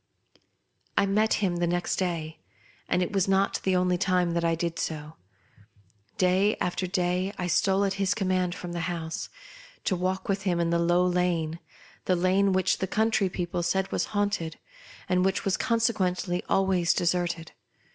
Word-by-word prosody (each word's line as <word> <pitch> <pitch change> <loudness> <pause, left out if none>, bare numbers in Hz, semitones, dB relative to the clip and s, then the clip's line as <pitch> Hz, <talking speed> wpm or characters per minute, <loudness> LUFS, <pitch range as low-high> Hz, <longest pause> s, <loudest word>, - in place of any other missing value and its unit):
I - - +4
met 215 +3 +2
him 175 -2 0
the 175 0 +1
next 175 +1 -1
day, 165 -4 -3 0.5
and 180 - +2
it 180 - -4
was 195 -2 +2
not 195 +1 +2
the 190 -1 +1
only 180 -1 +2
time 180 -2 +2
that 170 0 -1
I 165 0 +2
did 170 0 -3
so. 155 -1 -4 1.0
Day 190 +3 +3
after 180 +1 -1
day 180 +1 0
t 180 - -2
stole 195 +3 +2
at 195 - 0
his 195 +1 +2
command 185 -3 0
from 175 - -7
the 175 - -3
house, 165 -2 -4 0.5
to 190 - +1
walk 185 +1 -2
with 195 0 0
him 180 -3 0
in 170 0 +1
the 170 - +2
Low 175 +1 +3
Lane 175 -3 0 0.2
— - - -25
the 185 - +2
lane 190 +3 +2
which 185 0 +1
the 190 - -1
country 215 -1 +1
people 175 -1 -3
said 190 +3 0
was - - 0
haunted, 200 -6 -2 0.5
and 180 0 +2
which 190 +1 0
was 195 -1 +2
consequently 195 -6 0
always 190 -3 +2
deserted. 175 -1 -1
180 Hz, 175 wpm, -27 LUFS, 175-195 Hz, 1.0 s, I